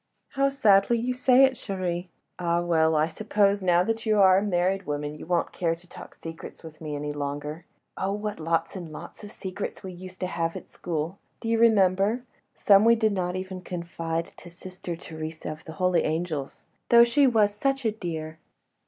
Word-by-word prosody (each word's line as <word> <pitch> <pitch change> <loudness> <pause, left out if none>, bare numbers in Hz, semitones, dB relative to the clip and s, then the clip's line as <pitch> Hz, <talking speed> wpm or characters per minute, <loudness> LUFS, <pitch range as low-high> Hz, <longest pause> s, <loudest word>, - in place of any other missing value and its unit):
"How 275 0 +1
sadly 225 -4 +4
you 245 +2 -1
say 250 +1 +5
it, 265 -1 +5
chérie.... 185 -6 -3 0.3
Ah, 170 -1 +1
well, 160 -2 +2
I 155 0 +4
suppose 200 +3 +1
now 175 -1 +4
that 225 +3 -2
you 215 -2 +2
are 190 -1 +7
a - - -3
married 195 -1 0
woman 145 0 -3
you 155 - -10
won't 175 -1 0
care 165 -2 0
to 175 +2 -19
talk - - -12
secrets 165 +1 -9
with 155 -1 -12
me 150 -2 -4
any 145 0 -3
longer. 145 +3 -5 0.3
Oh! 190 +1 -1
what 210 -1 -4
lots 165 +4 -1
and 175 -4 -7
lots 155 - -10
of 205 - -8
secrets 190 +1 -6
we 190 - -6
used 185 +1 -10
to - - 0
have 165 -2 -2
at - - -8
school! 165 +2 -4 0.2
Do - - -6
you 230 0 +2
remember?—some 205 0 +3
we 230 +1 +6
did 220 -2 +1
not 180 -2 -1
even 185 0 -5
confide 170 -2 -4
to 175 - -12
Sister 180 0 -7
Theresa 160 -1 -7
of 155 +1 -10
the 160 - -8
Holy 180 +2 +2
Angels—though 160 - +1
she 270 +4 +4
was 215 -4 +3
such 270 +4 -1
a 220 - +3
dear." 160 -6 -6
185 Hz, 190 wpm, -26 LUFS, 165-210 Hz, 0.3 s, are